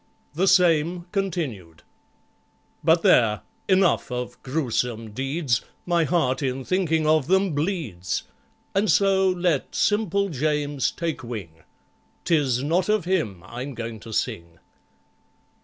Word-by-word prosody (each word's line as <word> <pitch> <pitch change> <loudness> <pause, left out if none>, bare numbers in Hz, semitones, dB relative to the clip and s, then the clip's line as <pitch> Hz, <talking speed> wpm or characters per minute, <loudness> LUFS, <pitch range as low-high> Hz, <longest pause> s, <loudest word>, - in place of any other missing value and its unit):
The 180 +6 +1
same, 175 -1 +3
continued 150 - -3 1.0
But - - +4
there—enough 135 - +2
of 125 0 -5
gruesome 125 -5 -2
deeds! 135 +1 -1 0.2
My 170 -2 +2
heart, 155 -5 +1
in 130 -1 -2
thinking 165 -4 +1
of 155 -2 +3
them, 190 -1 +2
bleeds; 145 - -2 0.5
And 200 +2 +1
so 190 +2 +4
let 175 -5 0
SIMPLE 200 -2 +1
JAMES 145 -2 0
take 165 -5 -3
wing,— 95 -10 -7 0.6
'Tis 140 -7 +2
not 175 +6 +1
of 215 -5 +2
him 135 - -1
I'm 125 +6 -6
going 115 -1 -5
to 115 +1 -11
sing. 85 -5 -3
150 Hz, 115 wpm, -24 LUFS, 120-180 Hz, 1.0 s, But